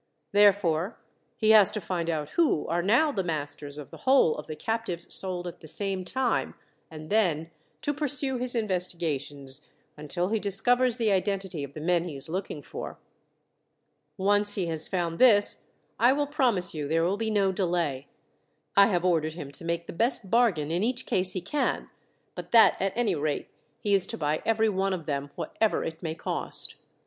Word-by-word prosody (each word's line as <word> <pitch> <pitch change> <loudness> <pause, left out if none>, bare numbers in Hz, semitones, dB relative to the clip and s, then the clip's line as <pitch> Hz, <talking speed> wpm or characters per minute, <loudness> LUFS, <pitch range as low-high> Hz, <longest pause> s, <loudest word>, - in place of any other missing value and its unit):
Therefore 200 -3 +3 0.4
he 220 -1 +3
has 210 -3 +7
to 215 - -2
find 170 -2 -3
out 155 -3 -2
who 325 - +1
are 170 +1 0
now 240 - +3
the 195 -8 -2
masters 145 -3 -4
of 150 - -9
the - - -10
whole 265 - +4
of 150 - -8
the 155 - -5
captives 190 -1 -2
sold 180 -2 -1
at 175 - -7
the 155 - -12
same 195 +2 -3
time, 250 +6 -1 0.3
and 155 +1 -10
then 165 -7 +1 0.3
to 290 - 0
pursue 280 -2 -1
his 250 0 +1
investigations 155 - -1 0.3
until 165 +5 -3
he 220 0 0
discovers 245 +5 +1
the 225 -3 +1
identity 190 -4 -1
of 140 0 -9
the - - -6
men 170 +2 +1
he 160 -5 -6
is 135 +3 -3
looking 175 -4 -4
for. - - -7 1.2
Once 205 +1 +2
he 190 - -1
has 160 -2 -1
found 170 -3 -2
this, 215 -5 +6 0.3
I 245 +3 +5
will 290 +1 0
promise 245 - +1
you 150 -3 -4
there 165 +2 +1
will 180 +4 +1
be 225 0 -2
no 200 -3 +2
delay. 170 -8 -1 0.7
I 200 0 +7
have 180 -4 0
ordered 160 -3 +1
him 150 -4 -8
to 145 - -6
make 170 0 -2
the - - -8
best 230 0 +1
bargain 200 -11 +2
in 170 +2 0
each 250 +3 -1
case 185 0 0
he 185 - -3
can, 240 +12 -2 0.4
but - - -8
that 230 -2 +6
at 195 0 0
any 235 -5 +1
rate 150 -2 -2 0.3
he 205 - 0
is 195 -2 +3
to - - -5
buy 150 -1 -1
every 225 0 +3
one 195 -1 0
of 170 -4 -5
them, 140 -2 -3
whatever 220 -1 -1
it 160 0 -6
may 160 -2 -3
cost. - - -4
185 Hz, 190 wpm, -27 LUFS, 160-220 Hz, 1.2 s, has